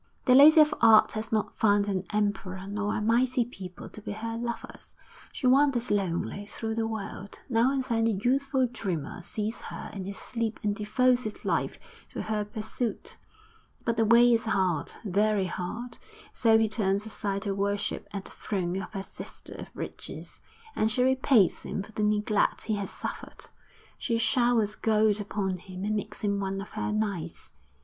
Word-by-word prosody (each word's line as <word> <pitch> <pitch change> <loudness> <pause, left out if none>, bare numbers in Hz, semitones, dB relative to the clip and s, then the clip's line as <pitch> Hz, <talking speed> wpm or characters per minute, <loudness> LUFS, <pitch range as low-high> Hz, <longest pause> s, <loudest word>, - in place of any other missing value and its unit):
The 250 - +5
Lady 295 +4 +9
of 300 -1 +6
Art 220 -1 +7
has 215 0 -5
not 215 -2 0
found 205 -2 +4
an 195 -2 -1
emperor 200 -3 -1
nor 205 +1 -2
a - - 0
mighty 245 +2 +2
people 190 -6 -9
to 215 - -11
be 205 - -5
her 225 +2 -4
lovers. 235 0 -6 0.4
She - - -5
wanders 260 -2 +4
lonely 200 +1 -1
through 220 +1 -4
the 225 0 -1
world; 205 -2 -6
now 235 +2 +3
and 270 -1 0
then 230 -3 +1
a - - +3
youthful 260 +5 +1
dreamer 185 - -4
sees 215 +5 -4
her - - -7
in 195 -2 -5
his 200 0 -6
sleep 230 -2 -3
and 205 -1 +1
devotes 245 +4 +2
his 215 - -6
life - - 0 0.3
to - - -5
her 215 -1 -1
pursuit; 215 +3 -4 0.7
but 230 - +1
the 225 - +3
way 235 +2 +6
is 225 -1 +1
hard, 185 -8 0
very 205 0 +2
hard; 225 +7 -5 0.3
so 225 -2 +4
he 225 0 +3
turns 200 -1 0
aside 200 -2 -3
to 200 -2 -1
worship 200 +1 -2
at 200 -2 -5
the - - -8
throne 185 -2 -2
of - - -8
her 195 -2 -3
sister - - -8
of - - -7
Riches, - - -7 0.3
and 215 - +2
she 250 +2 +2
repays 260 -6 +3
him 195 - -4
for 215 - -13
the 215 - -4
neglect 210 0 +1
he 220 - -1
has 200 -1 -4
suffered; - - -7 0.5
she 230 -2 0
showers 235 -2 +2
gold 215 -1 +2
upon 195 -2 -2
him 185 +1 -7
and 215 +1 0
makes 210 - -5
him 200 -1 0
one 195 0 -2
of 195 - -7
her - - -3
knights. 200 -6 -3
215 Hz, 180 wpm, -28 LUFS, 200-230 Hz, 0.7 s, Lady